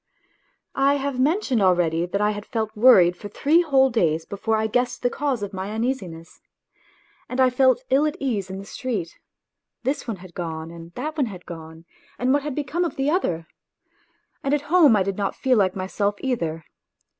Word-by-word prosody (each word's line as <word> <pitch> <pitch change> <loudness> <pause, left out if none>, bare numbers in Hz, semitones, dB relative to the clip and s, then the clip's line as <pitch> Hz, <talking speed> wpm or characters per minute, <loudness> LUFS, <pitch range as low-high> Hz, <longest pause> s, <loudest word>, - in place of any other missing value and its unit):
I 275 +1 +3
have 275 -2 -3
mentioned 280 - +1
already 175 -2 +2
that 200 +3 -2
I 210 0 +3
had 205 -1 -5
felt 220 -3 -3
worried 200 -7 +6
for 205 +3 -9
three 310 - +3
whole 270 -5 +3
days 165 -8 +1
before 220 +2 -1
I 220 - 0
guessed 245 +4 -1
the 245 - +2
cause 275 -7 -1
of 200 0 -5
my 190 +1 -4
uneasiness. 210 -8 -4 0.9
And 255 - -4
I 260 -1 +5
felt 255 0 +3
ill 280 +3 +4
at 305 +3 -4
ease 215 -9 -2
in 190 - -5
the 195 - -8
street 210 -5 -4 0.6
this 265 +1 -2
one 225 -4 -3
had 180 -1 -13
gone 160 -2 -5
and 170 0 -11
that 305 +5 -4
one 275 -5 +1
had 185 -4 -9
gone, 160 0 -10 0.3
and 255 +2 +1
what 290 - +2
had 290 -2 -4
become 300 +4 -1
of 340 - -3
the 275 +2 0
other? 175 - -1 1.0
and 275 +1 +2
at 295 - -2
home 315 -10 +7
I 200 - +3
did 195 0 -3
not 200 -1 -1
feel 260 -2 +2
like 185 -2 +2
myself 200 +2 -1
either. 165 - -2
220 Hz, 195 wpm, -23 LUFS, 185-270 Hz, 1.0 s, home